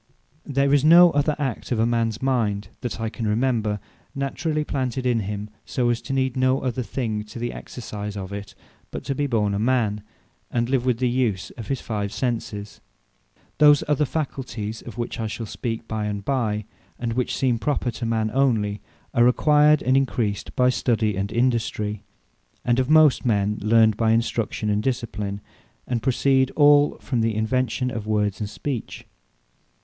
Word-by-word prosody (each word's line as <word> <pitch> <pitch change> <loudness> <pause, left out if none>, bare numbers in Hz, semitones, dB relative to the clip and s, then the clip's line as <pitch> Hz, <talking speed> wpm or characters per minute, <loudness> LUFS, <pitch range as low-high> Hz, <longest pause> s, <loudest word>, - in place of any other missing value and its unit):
There 140 0 +2
is 145 -1 +4
no 170 +2 +8
other 145 +1 +1
act 135 -6 -3
of 115 -1 +2
mans 115 -1 -1
mind, 105 -7 0
that 120 -3 -5
I 115 - -1
can 110 0 -4
remember, 110 -2 0 0.4
naturally 150 +3 -1
planted 130 -3 -2
in 120 -2 +2
him, 105 0 -5
so, 120 -2 0
as 120 - -2
to - - -7
need 130 -2 0
no 130 +1 +2
other 125 -1 -2
thing, 110 -3 -3
to 105 - -11
the 120 +1 -3
exercise 105 -3 -7
of 95 0 -6
it, 100 0 -7 0.3
but - - -6
to 140 - -2
be 145 +2 -1
born 105 -5 +1
a 100 - -1
man, 110 -3 +1 0.5
and 120 0 -1
live 130 -2 +1
with 125 -3 +2
the 125 +1 +1
use 120 -6 0
of 115 - -9
his 135 -2 -2
five 105 -3 -3
Senses. 110 -5 -4 0.8
Those 150 -1 +6
other 150 0 +2
Faculties, 125 -7 -4
of 120 - -10
which 120 0 -4
I 110 - -1
shall 115 +2 -5
speak 115 +1 -5
by 110 -1 -2
and 100 -1 -4
by, 110 -6 -1 0.3
and 120 -1 -2
which 125 +1 -1
seem 125 -3 +1
proper 130 -2 -1
to 115 - -8
man 110 -1 0
onely, 110 -7 +1 0.3
are 120 +1 +5
acquired, 150 +3 +4
and 130 +1 +2
encreased 120 -6 -1
by 125 0 +4
study 110 -4 +1
and 100 +2 -2
industry; 110 -4 0 0.6
and 120 +1 +2
of 130 +1 0
most 155 -3 +5
men 105 -3 +1
learned 110 0 +4
by 115 -1 +3
instruction, 115 -1 -1
and 105 0 +1
discipline; 105 -5 -3 0.4
and 120 -2 -2
proceed 130 +1 +2
all 145 -1 +5
from 125 -5 -1
the 110 -1 0
invention 125 +3 0
of 110 -4 -5
Words, 105 -2 0
and 105 -2 -3
Speech. 130 0 -5
120 Hz, 175 wpm, -23 LUFS, 105-130 Hz, 0.8 s, no